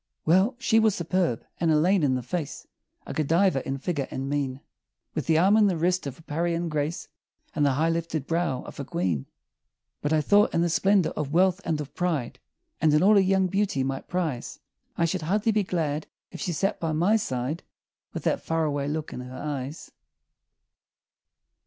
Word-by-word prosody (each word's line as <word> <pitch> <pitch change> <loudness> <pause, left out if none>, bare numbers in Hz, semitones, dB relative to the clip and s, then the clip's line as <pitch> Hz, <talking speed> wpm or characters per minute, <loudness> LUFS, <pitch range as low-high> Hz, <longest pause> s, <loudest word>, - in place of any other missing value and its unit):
Well, 190 - +4
she 240 -3 +3
was 220 -3 +3
superb 170 -7 -1
an 165 - +1
Elaine 170 +5 +4
in 135 -3 +2
the 125 - -3
face, 150 +4 -4 0.4
A - - -6
Godiva 165 0 +2
in 135 0 -2
figure 145 -2 -2
and 135 +1 -4
mien, 135 -2 -2 0.5
With - - -3
the 160 -1 +4
arm 190 +5 +5
and 215 -2 +5
the 180 - -1
wrist 180 0 +1
of 135 - -6
a 165 - -17
Parian 170 +2 -1
"Grace," 150 +1 -2 0.5
And 150 - 0
the 140 -2 +3
high 160 +5 +2
lifted 165 -3 -2
brow 165 -6 -1
of - - -10
a - - -2
queen; 85 - -2 0.7
But 145 - -1
I 155 - +4
thought, 205 +7 +3
in 170 - +3
the 175 - +2
splendor 195 0 +3
of 150 -1 -4
wealth 185 +2 +3
and 160 -2 -1
of 150 -1 -6
pride, 160 -9 -2 0.4
And 155 -1 +4
in 150 - +4
all 205 +3 +6
her 205 - +6
young 190 0 +3
beauty 190 -7 0
might 135 0 -3
prize, 160 -9 -3 0.4
I 170 - +3
should 175 +2 -1
hardly 205 +7 +1
be 215 0 +2
glad 160 -5 -2 0.2
if - - -8
she 180 - -1
sat 195 +5 -1
by 165 -2 -1
my 175 +8 +3
side 140 - -2 0.5
With - - -6
that - - +1
far 165 0 0
away 145 -2 -1
look 155 +1 -3
in - - -6
her 125 +1 -8
eyes. 145 0 -5
160 Hz, 195 wpm, -26 LUFS, 145-185 Hz, 0.7 s, all